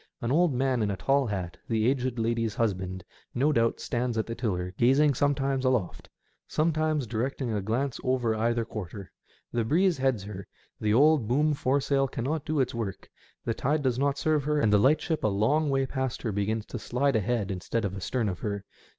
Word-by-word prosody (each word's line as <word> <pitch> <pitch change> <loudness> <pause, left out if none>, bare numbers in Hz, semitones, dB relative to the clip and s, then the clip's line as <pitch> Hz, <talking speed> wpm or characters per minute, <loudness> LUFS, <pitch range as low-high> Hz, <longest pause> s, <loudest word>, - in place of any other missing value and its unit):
An 120 -3 -2
old 170 +3 +4
man 130 -1 +1
in 105 - +1
a 100 - -2
tall 135 +2 +2
hat, 95 -5 -4
the 110 -1 +2
aged 130 -2 0
lady's 115 -1 0
husband, 95 -4 -2 0.3
no 140 +5 +3
doubt, 115 -4 +1
stands 120 -1 -2
at 110 - 0
the 115 - -4
tiller, 90 -7 -2
gazing 135 +6 +4
sometimes 135 0 0
aloft, 125 -8 -1 0.4
sometimes 155 -2 +1
directing 120 +3 -2
a 105 - -1
glance 120 +6 -1
over 125 -3 +1
either 115 +1 0
quarter. 100 -3 -7 0.4
The 120 -1 +1
breeze 170 - +2
heads 130 -6 +1
her; 100 -1 -8 0.3
the 105 - 0
old 140 0 +4
boom 150 +6 +2
foresail 135 0 +1
cannot 140 +5 -3
do 155 -1 0
its 130 - +1
work; 110 -5 -5 0.3
the 115 - 0
tide 145 +6 0
does 125 -2 +1
not 140 0 +1
serve 150 0 +1
her, 150 0 +1
and 110 -7 +3
the 105 - +6
lightship 155 +6 +2
a - - +3
long 115 +10 +2
way 135 -1 +1
past 130 -1 -3
her 110 - -1
begins 105 +2 -1
to 120 - -6
slide 125 +5 0
ahead 110 -1 0
instead 100 +4 -2
of 95 -1 -3
astern 110 +4 -1
of 90 -3 -3
her. 100 -2 -4
120 Hz, 195 wpm, -28 LUFS, 110-140 Hz, 0.4 s, the